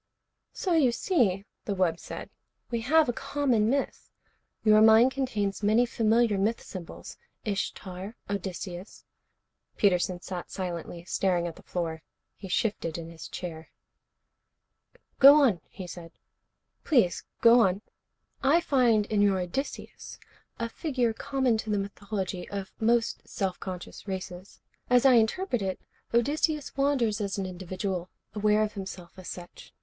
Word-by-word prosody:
"So 365 - -1
you 290 -7 +4
see," 225 - +1 0.2
the 200 - -2
wub 175 -3 +1
said, - - -8 0.4
"we 235 -1 -1
have 310 +6 +4
a 245 - 0
common 245 -5 +1
myth. 275 +2 -2 0.5
Your 215 -1 +6
mind 220 +3 +7
contains 215 -8 -2
many 215 +4 +4
familiar 225 -2 +2
myth 220 +4 +1
symbols. 180 -4 -9 0.3
Ishtar, 195 0 -4
Odysseus 190 -1 -6 0.4
" - - -48
Peterson 180 -2 +2
sat 180 0 -6
silently, 175 -2 -5
staring 180 -2 +1
at 170 -2 -5
the - - -14
floor. 165 -3 -4 0.3
He 195 - -9
shifted 180 -4 -1
in 165 0 -7
his 165 -1 -9
chair. 165 -3 -7 1.5
"Go 280 +2 +10
on," 250 - +4
he 190 - -8
said. 170 -1 -9 0.7
"Please 235 - +2 0.2
go 235 +1 +7
on." 195 -2 +2 0.6
"I 285 +5 +4
find 245 -9 +3
in 210 -1 +1
your 200 -2 +4
Odysseus 180 +11 -5 0.4
a 230 - -2
figure 250 -3 -1
common 255 -1 0
to 220 - -5
the 210 - +1
mythology 195 -2 -4
of 195 -1 -5
most 230 +1 +1
self 190 -3 -2
conscious 185 +1 -8
races. 185 0 -7 0.3
As 250 +1 +4
I 265 - +8
interpret 245 - +2
it, 190 -1 -2 0.3
Odysseus 295 +5 +1
wanders 260 -6 +1
as 200 -1 -2
an 195 - -2
individual, 185 0 -4 0.2
aware 210 0 +3
of 215 - -2
himself 190 -3 -7
as 185 - -10
such. 175 -1 -10
205 Hz, 140 wpm, -28 LUFS, 185-240 Hz, 1.5 s, Go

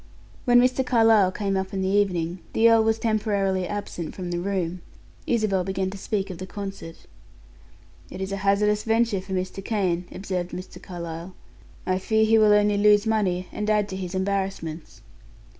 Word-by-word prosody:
When 245 -1 +6
Mr. 255 +1 +3
Carlyle 225 -6 +4
came 195 0 -2
up 190 0 -2
in 190 - -1
the - - 0
evening, 185 -3 0
the 230 +1 +5
earl 225 -1 +5
was 220 0 +2
temporarily 205 -4 0
absent 190 -5 -5
from 180 -2 -5
the 175 - -1
room. 180 -2 -2 0.5
Isabel 215 -5 +1
began 190 0 -2
to 200 - -7
speak 195 -1 -2
of 175 - -9
the 185 - -6
concert. 195 -4 -8 1.0
"It - - -8
is 190 0 -4
a 195 - -2
hazardous 205 +2 +2
venture 225 -3 +1
for 190 0 -7
Mr. 185 +1 -3
Kane," 185 -5 -1
observed 185 -2 -4
Mr. 185 +1 -8
Carlyle. 170 0 -7 0.5
"I 185 0 0
fear 220 +3 +2
he 220 0 +4
will 215 -1 +5
only 210 0 +4
lose 205 +1 +5
money, 190 -5 0
and 210 0 -3
add 210 -1 +2
to 190 - -5
his 185 -1 -5
embarrassments." 190 - -3
195 Hz, 175 wpm, -25 LUFS, 185-210 Hz, 1.0 s, When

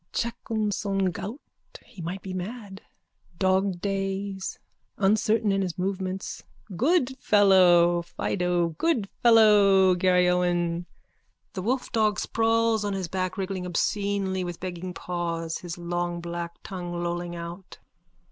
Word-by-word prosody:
Chacun 220 -2 -2
son 195 -2 0
goût. 215 +10 -5 0.5
He 180 - -12
might 180 +4 -5
be 190 - -6
mad. 195 +1 -6 0.6
Dogdays. 195 +1 -1 0.4
Uncertain 215 +1 +2
in 195 0 +1
his 180 -3 -3
movements. 190 0 -3 0.3
Good 265 - +1
fellow! 180 -5 +5
Fido! 175 0 -1
Good 275 -12 +1
fellow! 205 -5 +6
Garryowen! 180 -1 +2 0.7
_(The 185 - -4
wolfdog 220 -3 +1
sprawls 225 -1 +1
on 205 -1 -1
his 190 -3 -3
back, 185 +2 -2
wriggling 190 -1 -3
obscenely 195 +1 -1
with 175 -1 -5
begging 180 -1 -6
paws, 170 -2 -3
his 175 -1 -7
long 175 0 -2
black 170 0 -5
tongue 175 -2 -5
lolling 175 0 -3
out.) 170 +2 -8
190 Hz, 115 wpm, -26 LUFS, 175-205 Hz, 0.7 s, fellow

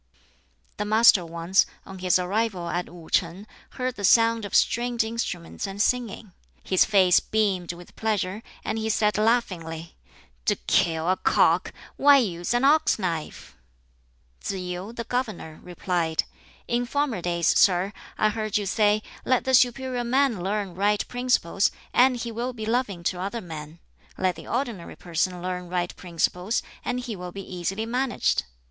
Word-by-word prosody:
The 210 - -2
Master 215 -3 +6
once, 170 +3 +1 0.2
on 190 -1 -10
his 180 -1 +3
arrival 185 -1 -1
at 175 +1 -2
Wu 170 -2 -12
shing, 180 +4 0 0.3
heard 255 -1 -2
the 205 - -6
sound 230 +1 +4
of 205 - -4
stringed 240 0 +2
instruments 220 -6 -4
and 195 +1 -7
singing. 225 -3 -1 0.3
His 185 - +3
face 190 -4 +5
beamed 195 -5 0
with 175 0 -14
pleasure, 210 -2 -1 0.2
and 225 - -1
he 220 0 -2
said 210 -2 +2
laughingly, 175 -8 -1 0.5
"To - - +3
kill 165 -3 +2
a 185 +1 +2
cock - - +3 0.3
why 285 0 +7
use 175 -8 -1
an 240 - +1
ox 305 +3 +4
knife?" 170 -6 -4 0.9
Tsz - - -2
yu, 180 +2 -5
the 235 0 -5
governor, 215 -10 -4
replied, 175 -2 -1 0.4
"In 240 0 0
former 280 -7 -1
days, 170 -1 -1
sir, 190 +1 +3 0.2
I 215 - +3
heard 215 -1 -1
you 205 - -2
say, 210 +1 +2 0.2
'Let 255 -1 +2
the 260 - -1
superior 250 0 +3
man 250 -4 +1
learn 200 0 -2
right 205 +3 +1
principles, 245 -7 +1 0.2
and 255 0 +5
he 235 0 -4
will 240 +3 -3
be 220 -2 -6
loving 220 -6 -1
to 180 +1 -1
other 200 +5 -3
men; 160 -4 -8 0.4
let 185 -2 +1
the - - -11
ordinary 235 -8 -3
person 175 +1 -2
learn 180 -1 -4
right 175 -1 -2
principles, 180 +4 -1 0.2
and 250 0 -2
he 240 -3 -5
will 180 -1 -7
be 195 +1 -8
easily 195 +5 -2
managed.'" 250 - 0
200 Hz, 160 wpm, -25 LUFS, 180-235 Hz, 0.9 s, why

